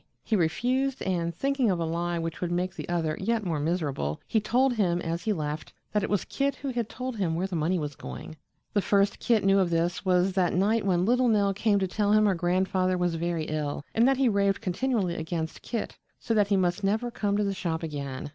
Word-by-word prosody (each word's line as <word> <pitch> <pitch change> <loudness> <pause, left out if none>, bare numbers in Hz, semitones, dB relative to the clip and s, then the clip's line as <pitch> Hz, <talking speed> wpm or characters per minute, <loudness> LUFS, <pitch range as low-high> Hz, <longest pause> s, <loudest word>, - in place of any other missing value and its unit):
He 220 - 0
refused, 250 +10 0
and 170 -3 0
thinking 270 - 0
of 180 -3 +1
a 165 - 0
lie 170 +1 -1
which 165 -1 -4
would 175 -1 -1
make 180 +1 -1
the - - -7
other 165 -3 0
yet 230 -2 0
more 165 -4 -1
miserable, 145 - -1
he 220 - +1
told 250 +5 +2
him 180 -6 +1
as 170 0 -3
he 220 - +2
left 155 -4 -3 0.2
that 210 - +1
it - - -2
was 205 -2 0
Kit 280 0 -1
who 280 - -5
had 240 -4 -2
told 255 -2 -5
him 175 -5 0
where 180 +3 -1
the 190 -2 -4
money 165 +3 +1
was 145 -3 -4
going. 160 - -8 0.4
The 205 - +3
first 200 0 +2
Kit 230 -4 +2
knew 195 0 +4
of 185 -2 +2
this 170 +1 0
was 185 0 +2
that 180 -2 +1
night 205 +3 +2
when 180 -1 +2
little 250 +3 +3
Nell 205 -3 +3
came 205 +1 +2
to 190 -1 +1
tell 205 +2 +1
him 215 0 +5
her 200 - +4
grandfather 185 +1 +1
was 175 -1 0
very 165 0 -1
ill, 150 -2 -3
and 230 +3 +4
that 270 -1 +3
he 270 -1 +3
raved 200 -2 +2
continually 200 -1 0
against 160 0 -4
Kit 230 -3 -4 0.2
so 230 - -1
that 210 -2 +3
he 200 -1 +2
must 180 +1 0
never 220 +5 0
come 205 -3 0
to 210 - +1
the 200 -1 0
shop 165 -3 -3
again. 140 -4 -4
185 Hz, 235 wpm, -27 LUFS, 170-215 Hz, 0.4 s, him